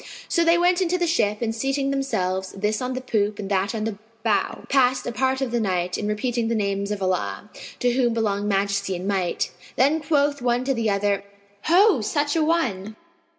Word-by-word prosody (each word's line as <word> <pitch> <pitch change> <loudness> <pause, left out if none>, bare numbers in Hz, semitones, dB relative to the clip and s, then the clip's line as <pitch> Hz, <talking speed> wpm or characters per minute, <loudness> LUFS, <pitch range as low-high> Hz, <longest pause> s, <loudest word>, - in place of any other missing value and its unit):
So 340 - +2
they 335 +1 +4
went 355 +1 +3
up - - -1
into 365 0 +1
the 350 - +1
ship 215 - +1
and 225 -1 -1
seating 270 +4 -1
themselves, 190 -9 -1
this 210 +3 -1
on 255 0 -2
the 255 - -3
poop 210 -4 0
and 205 -1 -6
that 195 +3 0
on 215 - -2
the 215 -2 -4 0.2
bow, 220 -3 0
passed 255 -2 +2
a - - -2
part 265 +2 0
of 260 -3 -1
the 240 - +1
night 180 -4 -1
in 210 - -3
repeating 230 +2 -1
the 230 - 0
names 200 -1 -1
of 205 -2 -3
Allah 100 - -2 0.3
(to 245 - +3
whom 245 -1 +2
belong 205 -3 -1
Majesty 195 -1 0
and 180 +2 -5
Might!). 190 -3 -1 0.2
Then 290 +5 +3
quoth 285 -2 +1
one 245 0 +1
to 270 +1 0
the 230 -3 0
other, 200 0 0 0.4
"Ho, 360 - +5
such 290 +7 0
an 315 -2 +2
one! 220 - -1
225 Hz, 210 wpm, -23 LUFS, 200-270 Hz, 0.4 s, Ho